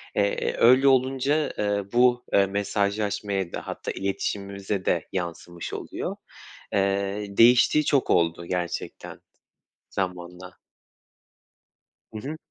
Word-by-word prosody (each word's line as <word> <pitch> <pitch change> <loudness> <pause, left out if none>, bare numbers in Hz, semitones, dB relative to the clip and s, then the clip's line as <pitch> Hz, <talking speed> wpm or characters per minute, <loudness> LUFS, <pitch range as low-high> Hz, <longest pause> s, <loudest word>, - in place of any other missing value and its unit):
Eee, 100 0 0
öyle 130 +4 +6
olunca, 135 +3 +2
eee, 105 -1 0
bu, 120 0 +4
eee, 100 - +5
mesajlaşmaya 100 -1 -1
da - - -6
hatta - - -4
iletişimimize 100 0 -3
de 85 -2 0
yansımış 85 -1 -5
oluyor. - - -5 0.6
Eee, 100 +1 0
değiştiği 120 +5 +6
çok 140 -2 +2
oldu 85 0 +2
gerçekten 90 0 -4 0.7
zamanla. 90 -1 -5 1.6
Hı 110 - -5
hı. 155 +2 -5
100 Hz, 100 wpm, -25 LUFS, 95-120 Hz, 1.6 s, öyle